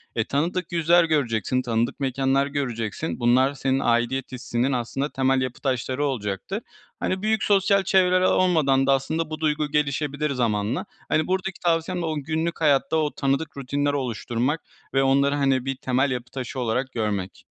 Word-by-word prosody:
E, 110 - +1
tanıdık 170 +7 -1
yüzler 170 +1 +4
göreceksin, 130 -6 0
tanıdık 115 0 -1
mekânlar 135 +1 +1
göreceksin. 125 -1 -3
Bunlar, 130 +3 +3
senin 135 -1 0
aidiyet 120 +2 0
hissinin 125 +1 -1
aslında 130 +3 -2
temel 135 -1 +1
yapı 130 -1 -4
taşları 130 +1 -1
olacaktır. 130 - -3 0.4
Hani, 185 0 -1
büyük 215 0 +1
sosyal 200 -1 +3
çevreler 185 -1 +3
olmadan 155 -8 +3
da 135 - +5
aslında 155 +4 -1
bu 155 0 -5
duygu 150 -1 0
gelişebilir 150 0 0
zamanla. 115 - -1 0.2
Hani, 155 0 +1
buradaki 190 0 -2
tavsiyem 170 +1 0
de - - -2
o 160 -1 -2
günlük 160 +3 -2
hayatta, 145 0 +3
o 150 -2 +1
tanıdık 140 +2 -1
rutinler 145 +2 -1
oluşturmak 125 +2 -1 0.3
ve 135 0 +3
onları, 140 +1 +3
hani, 135 -3 +1
bir 135 0 -2
temel 130 +1 0
yapı 125 -1 -4
taşı 130 0 -5
olarak 125 +2 -1
görmek. 105 -5 -3
140 Hz, 160 wpm, -24 LUFS, 125-160 Hz, 0.4 s, da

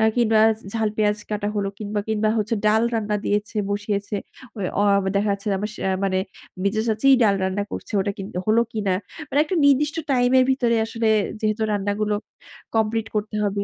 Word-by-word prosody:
কিংবা 225 -2 +3 0.3
ঝাল 220 -1 +1
পেঁয়াজ 210 -1 +2
কাটা 205 -1 -2
হলো 200 -1 0
কিংবা 210 0 -2
কিংবা 215 0 +1
হচ্ছে 225 +2 0
ডাল 220 +1 +4
রান্না 210 -2 0
দিয়েছে, 205 +2 -1
বসিয়েছে। 205 0 -2 0.4
ঐ - - -6 0.2
অ - - +3 0.3
দেখা 205 +1 +2
যাচ্ছে 200 +2 -9
আমার 210 +2 -3
সে - - -9 0.2
মানে 190 -1 +1 0.5
মেঝো 215 +2 +1
চাচীই 230 +5 +4
ডাল 200 -2 +4
রান্না 190 +2 -1
করছে। - - -6
ওটা 200 +1 0
কিন্তু 195 -2 -6
হল 220 +1 +4 0.2
কিনা? 205 -4 0 0.4
মানে 285 - +1
একটা 360 +4 -3
নির্দিষ্ট 290 +2 +3 0.2
টাইম 245 -1 +3
এর - - +6
ভিতরে 240 -3 +1
আসলে 230 0 -2 0.3
যেহেতু 215 0 0
রান্না 205 0 0
গুলো 210 0 +1 0.6
কমপ্লিট 225 0 +1
করতে 210 0 -2
হবে। 200 0 -1
215 Hz, 180 wpm, -23 LUFS, 205-225 Hz, 0.6 s, এর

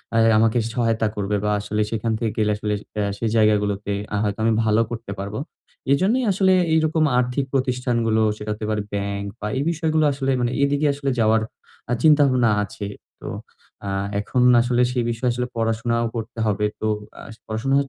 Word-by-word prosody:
আ - - +4 0.2
আমাকে 115 +2 +3 0.2
সহায়তা 115 -2 +1
করবে 105 0 -1
বা 105 - +1
আসলে 105 +1 -2
সেখান 115 0 -1
থেকে 110 -1 -2 0.2
আসলে, 105 0 -2 0.3
এ - - +1 0.2
সেই 115 - 0
জায়গাগুলোতে 105 -2 +2 0.2
আ - - 0
হয়তো 105 0 -2
আমি 115 0 +3
ভালো 110 0 +3
করতে 115 -3 -6
পারব। 100 +2 -5 0.6
এজন্যই 210 - +2
আসলে 190 0 +3 0.2
এইরকম 160 0 +2
আর্থিক 125 +2 0
প্রতিষ্ঠানগুলো 125 -4 +1 0.2
সেটা 105 0 -7
হতে 105 0 -6
পারে 105 -1 0
ব্যাংক, 100 0 -2
বা 105 - -3
এই 135 - 0
বিষয়গুলো 160 -1 +1
আসলে 135 0 -1
মানে, 120 0 0
এদিকে 145 +1 +1
আসলে 140 0 -3
যাওয়ার 110 0 +3 0.5
আ - - +3
চিন্তাভাবনা 140 -6 +5
আছে। 100 0 -6 0.4
তো - - -7 0.6
আ - - -2 0.3
এখন 125 +5 -1 0.2
আসলে 120 0 +1
সেই 125 -1 0
বিষয়ে 115 +2 -1
আসলে 125 +1 -2
পড়াশোনাও 115 +1 0
করতে 115 0 -5
হবে। 105 0 +1 0.2
তো 110 - 0 0.3
আ - - -9 0.3
পড়াশোনা 110 +5 0
115 Hz, 170 wpm, -22 LUFS, 105-130 Hz, 0.6 s, চিন্তাভাবনা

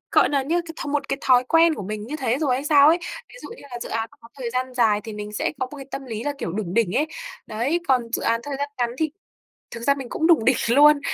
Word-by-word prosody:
gọi - - +5
nà, 280 -2 +1
như 335 +6 0
cái 325 - -7
th - - -5
một 285 0 -1
cái 275 - 0
thói 255 -1 +4
quen 325 +4 +4
của 205 - -6
mình 210 +2 -5
như 295 +5 -4
thế 260 -3 0
rồi 285 -5 +1
hay 265 +3 -3
sao 295 -1 +6
ấy. 335 +3 +4 0.3
Ví - - -17
dụ - - -8
như - - -14
là 245 - -5
dự - - -7
án 225 0 -2
nó - - -20
có 230 - -14
thời 245 -3 -3
gian 255 +1 -2
dài 220 -4 +3
thì 220 - -6
mình 210 0 -7
sẽ 210 - -1
có 260 - 0
một - - -7
cái 275 -1 -9
tâm 275 - -5
lý 225 -1 -5
là, 290 - -1
kiểu, 170 - -4
đủng 190 -2 -4
đỉnh 225 -5 +2
ấy. 300 - +2 0.4
Đấy, 255 +11 -1
còn 255 -2 +4
dự - - -1
án 230 0 +1
thời 285 -1 -4
gian 285 0 -2
ngắn 240 -1 +1
thì 315 -1 0 0.6
thực 230 - -7
ra 280 - +4
mình 270 -3 -7
cũng 320 - 0
đủng 325 -9 +5
đỉnh 255 +1 +4
luôn 290 +3 +6
260 Hz, 300 wpm, -23 LUFS, 230-290 Hz, 0.6 s, sao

